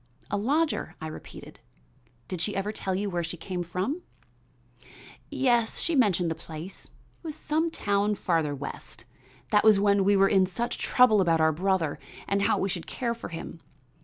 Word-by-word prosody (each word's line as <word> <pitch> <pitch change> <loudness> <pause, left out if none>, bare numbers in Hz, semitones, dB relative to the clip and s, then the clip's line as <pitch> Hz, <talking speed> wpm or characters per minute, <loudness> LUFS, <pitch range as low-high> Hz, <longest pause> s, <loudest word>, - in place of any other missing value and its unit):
"A - - +1
lodger?" 295 +9 0
I - - -6
repeated. 155 - -10 0.7
"Did 185 -3 -4
she 205 +3 -1
ever 195 +2 -1
tell 190 -3 -3
you 200 +2 -1
where 175 -3 -2
she 165 +1 -5
came 180 +2 -4
from?" 185 - -3 1.3
"Yes, 240 -4 +1
she 335 - -1
mentioned 185 - +3
the - - +1
place, 165 +4 -9
it - - -22 0.3
was 315 -3 -6
some 315 +2 0
town 205 -7 0
farther 165 -6 0
west. 130 -4 -8 0.5
That 210 - +4
was 215 -2 +6
when 200 -1 +3
we 200 +1 +4
were 195 0 +5
in 190 -2 +4
such 235 +6 -3
trouble 235 -5 +5
about 165 -3 +3
our 160 0 +4
brother 180 -1 0 0.3
and 200 0 +1
how - - +2
we 195 - 0
should 180 -3 -4
care 235 -2 -2
for 235 - -8
him. 165 0 -8
195 Hz, 180 wpm, -27 LUFS, 170-220 Hz, 1.3 s, was